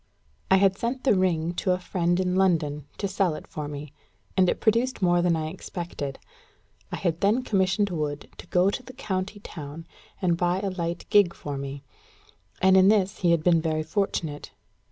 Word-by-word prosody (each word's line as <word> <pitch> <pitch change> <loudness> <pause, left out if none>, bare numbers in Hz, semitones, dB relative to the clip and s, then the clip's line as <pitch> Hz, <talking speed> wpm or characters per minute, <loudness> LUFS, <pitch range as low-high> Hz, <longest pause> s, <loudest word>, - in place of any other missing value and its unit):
I 190 - +6
had 195 0 +3
sent 250 +2 -2
the 270 - +4
ring 175 -3 +1
to 185 - +2
a - - 0
friend 175 -1 0
in 180 -1 0
London, 155 -6 +1
to 200 - -1
sell 190 -4 0
it - - -9
for 150 -1 -6
me; 145 0 -7 0.4
and 185 -1 +4
it - - -1
produced 235 +3 +1
more 175 -1 +4
than 175 -1 +2
I 155 -1 -2
expected. 170 -5 -6 0.7
I - - -2
had 170 -2 -1
then 215 +6 +3
commissioned 195 -1 +1
Wood 150 -3 -3
to - - -10
go 185 +2 +3
to 250 - -4
the 255 0 -12
county 200 -2 -3
town 155 -3 -8 0.3
and 175 -3 +1
buy 175 +1 +1
a 200 -2 -2
light 170 -1 -3
gig 205 -5 +5
for 145 -1 -5
me; 140 0 -6 0.8
and 190 0 +6
in 190 0 +7
this 200 -1 +2
he 175 - +2
had 170 -2 +3
been 170 -2 +4
very 155 -1 -1
fortunate. 160 -5 -2
180 Hz, 195 wpm, -26 LUFS, 160-195 Hz, 0.8 s, in